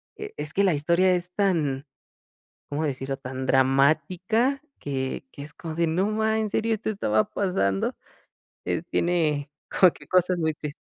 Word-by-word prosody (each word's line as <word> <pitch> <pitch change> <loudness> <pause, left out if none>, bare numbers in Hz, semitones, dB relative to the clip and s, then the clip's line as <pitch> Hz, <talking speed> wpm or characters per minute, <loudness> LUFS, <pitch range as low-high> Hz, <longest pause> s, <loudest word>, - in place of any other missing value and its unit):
e - - -7
es 150 +1 -3
que 200 - +2
la 185 -4 +4
historia 170 +5 +3
es 180 0 -3
tan, 155 -9 0 0.8
¿cómo 150 +2 -1
decirlo?, 135 0 -3
tan 130 0 -5
dramática 160 - +2 0.2
que 135 - -3
que 140 - -9
es 150 - -9
como 160 -2 -6
de: 170 0 +1
"No 180 +5 +1
ma 220 0 +1
¿en 215 - -1
serio, 225 +1 0
esto 215 - -4
estaba 110 - +1
pasando?", 100 - 0 0.7
eh, 160 - -1
tiene 155 -5 +1 0.2
como 185 -3 +5
que - - -16
cosas 180 -1 +2
muy 160 -1 +1
tris 150 -1 -6
160 Hz, 165 wpm, -25 LUFS, 140-185 Hz, 0.8 s, como